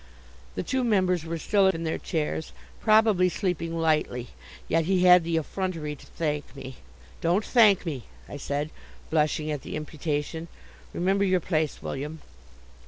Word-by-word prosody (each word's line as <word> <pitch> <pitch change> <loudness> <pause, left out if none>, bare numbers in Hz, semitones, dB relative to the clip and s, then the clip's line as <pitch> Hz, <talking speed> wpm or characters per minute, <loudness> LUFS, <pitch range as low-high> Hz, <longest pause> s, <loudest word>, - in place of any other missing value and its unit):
The - - -2
two 260 +8 0
members 185 -7 +2
were 165 0 -3
still 195 +4 +3
in 165 -3 0
their 160 - -2
chairs, 160 -1 -3 0.3
probably 215 -4 +4
sleeping 170 -3 -2
lightly; 150 -7 0 0.4
yet 165 0 +2
he 185 0 +2
had 180 -1 +8
the 165 0 0
effrontery 160 -2 -3
to - - -16
thank 150 -3 -3
me. 130 -3 -8 0.4
"Don't 175 +6 +2
thank 215 -6 +5
me," 135 - -4 0.2
I - - -7
said, 145 +2 -3 0.4
blushing 155 0 +1
at 145 -3 -3
the - - -6
imputation. 155 +1 -3 0.4
"Remember 195 +3 +1
your 185 -2 +3
place, 155 -3 -1
William!" 150 +4 -5
165 Hz, 150 wpm, -27 LUFS, 150-185 Hz, 0.4 s, had